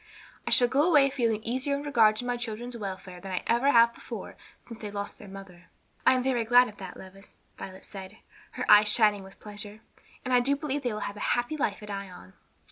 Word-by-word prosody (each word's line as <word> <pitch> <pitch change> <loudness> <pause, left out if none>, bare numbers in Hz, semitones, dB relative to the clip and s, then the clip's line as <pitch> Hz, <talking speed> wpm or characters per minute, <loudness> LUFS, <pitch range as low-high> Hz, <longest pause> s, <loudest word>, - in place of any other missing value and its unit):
I - - +1
shall 245 - +5
go 270 +4 +2
away 285 -5 +5
feeling 230 -5 0
easier 260 +5 -1
in 285 - -5
regard 230 -7 +4
to 245 - -5
my 245 0 -1
children's 240 0 -5
welfare 190 -4 -7
than 190 0 -7
I 185 - -2
ever 240 +4 +2
have 235 -3 +5
before - - -8 0.3
since 230 -2 -10
they 210 - -5
lost 200 0 -6
their 205 - -11
mother." 190 -2 -12 0.4
"I - - +8
am 255 -1 0
very 250 -3 +1
glad 245 +2 +5
of 210 - -12
that, 190 -2 -9
Levis," 195 +1 -14 0.2
Violet 190 0 -10
said, 195 +1 -10 0.4
her 250 - -4
eyes 210 0 +7
shining 210 -1 +3
with 190 0 -14
pleasure, 210 0 -7 0.4
"and 255 - -1
I 250 - +6
do 275 +3 +1
believe 285 0 -3
they 245 -3 -2
will 210 0 -5
have 205 - -5
a - - 0
happy 240 +5 -2
life 215 -8 -2
at 210 - -8
Ion." 190 - -8
220 Hz, 225 wpm, -28 LUFS, 200-245 Hz, 0.4 s, I